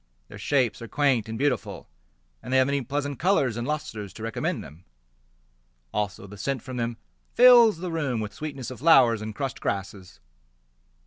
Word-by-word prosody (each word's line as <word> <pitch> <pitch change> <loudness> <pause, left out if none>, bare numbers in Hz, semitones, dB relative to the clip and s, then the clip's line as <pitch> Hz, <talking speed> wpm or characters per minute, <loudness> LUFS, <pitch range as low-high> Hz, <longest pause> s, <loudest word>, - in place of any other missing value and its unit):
Their - - -10
shapes 125 -7 0
are 115 - -7
quaint 125 -3 +1
and 110 - -4
beautiful, 135 -4 -2 0.5
And - - -8
they 130 - +4
have 130 - +5
many 140 +1 0
pleasant 145 +2 -3
colours 165 - +2
and 120 +2 -4
lustres 125 - -4
To 110 - -10
recommend 115 0 -2
them. 80 +5 -14 1.1
Also 105 -1 -3
the 100 0 -12
scent 135 +3 -2
from 130 -2 -7
them 115 -1 -2 0.4
fills 240 -5 +7
the 175 +1 -5
room 145 -8 -1
With 105 -1 -5
sweetness 135 -3 -6
of 130 - -9
flowers 130 -7 +5
and 110 0 -6
crushed 135 0 -4
grasses. 95 -1 -5
125 Hz, 175 wpm, -26 LUFS, 110-145 Hz, 1.1 s, fills